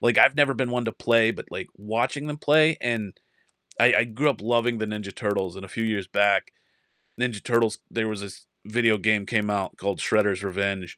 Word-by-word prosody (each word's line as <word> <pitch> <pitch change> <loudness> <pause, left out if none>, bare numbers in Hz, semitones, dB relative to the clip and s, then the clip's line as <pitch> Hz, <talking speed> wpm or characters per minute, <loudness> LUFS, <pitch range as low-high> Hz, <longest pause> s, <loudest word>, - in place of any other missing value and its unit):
Like, 120 -1 +3
I've - - +7
never 145 -2 +4
been 130 -2 -2
one 125 -1 -1
to 115 - -2
play, 115 -1 +3
but - - -8
like, - - -6
watching 115 +7 -2
them 150 -1 -4
play, 155 +2 +4
and 115 -5 -3 0.6
I - - +6
I - - +5
grew 125 +6 0
up 135 - -3
loving 115 +1 +1
the 110 - -2
Ninja 105 -2 -6
Turtles, 100 -5 -2
and 95 - -9
a - - -13
few 115 - -4
years 105 -4 -2
back, 100 0 +2 0.7
Ninja 120 -4 -2
Turtles, 115 -2 +1
there 110 -1 -1
was 105 -2 -4
this 100 -2 -10 0.2
video 115 0 +2
game 105 0 +1
came 105 -1 0
out 100 -2 -2
called 100 0 -3
Shredder's 105 -3 +1
Revenge, 100 -1 -3
110 Hz, 210 wpm, -25 LUFS, 100-120 Hz, 0.7 s, I've